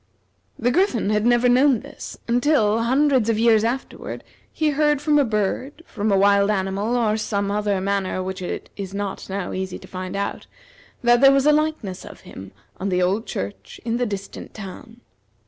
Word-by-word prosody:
The 245 +1 +1
Griffin 250 - +1
had 210 +2 +2
never 240 0 +4
known 255 -1 +4
this, - - -9
until, 240 -3 +2
hundreds 260 -1 +2
of 225 - +2
years 225 -1 +4
afterward, 245 +4 -4 0.3
he 310 -1 0
heard 295 0 +2
from 295 0 +3
a - - +5
bird, 235 +7 -2
from 215 -2 -2
a 195 - +4
wild 200 +1 +4
animal, 200 +3 -1
or 225 -3 +2
in 215 - 0
some 200 -2 -1
manner 200 -2 -1
which 190 0 -5
it 180 - -5
is 195 -1 -6
not 200 -1 -4
now 190 -1 -3
easy 190 -1 -4
to - - -14
find 185 0 -6
out, 200 0 -3 0.6
that 240 0 +4
there 275 0 +8
was 275 0 +3
a 300 - +6
likeness 300 -12 -1
of - - -12
him 95 0 -11 0.3
on 195 - -2
the 180 -1 +1
old 195 +5 0
church 95 0 -6
in 230 0 0
the 245 0 0
distant 200 -1 -7
town. 220 +3 -10
215 Hz, 185 wpm, -22 LUFS, 195-245 Hz, 0.6 s, there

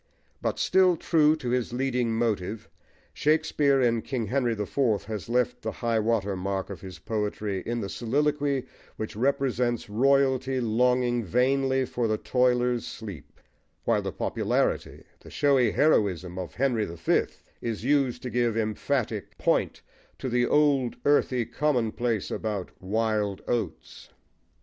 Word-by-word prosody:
But - - -1
still 185 -2 +4
true 155 -2 +3
to 130 -6 -5
his 125 -1 -1
leading 125 -2 0
motive, 110 -4 -1 0.5
Shakespeare, 150 -2 +2
in 120 -3 +2
King 125 -3 -3
Henry 120 +1 0
the 105 -1 -3
Fourth, 115 -3 0
has 105 -2 -6
left 125 0 0
the - - -3
high 115 -2 0
water 105 -3 0
mark 95 +1 -3
of 95 - -8
his 95 -2 -9
poetry 105 -2 -3
in 120 0 -1
the 100 - -3
soliloquy 140 +5 0 0.3
which 110 - -5
represents 125 -3 0
royalty 135 +2 +2
longing 120 +1 +2
vainly 130 +5 +2
for 120 -1 -1
the 110 0 0
toiler's 125 0 +1
sleep; 100 -9 -9 0.4
while - - +2
the - - -3
popularity, - - -1 0.2
the - - -14
showy 135 -4 +3
heroism, 95 - +1
of 90 -3 -6
Henry 125 -5 +1
the 85 -2 -8
Fifth, 85 - 0 0.2
is 115 -2 -3
used 135 -2 +1
to 125 - -4
give 120 -2 +1
emphatic 110 - -2
point - - 0 0.3
to 130 - -4
the 120 0 +2
old 140 -5 +3
earthy 130 -4 +3
commonplace 120 -4 -1
about 105 -4 -3
"wild 105 0 -1
oats." 120 -2 -4
120 Hz, 140 wpm, -27 LUFS, 110-135 Hz, 0.5 s, still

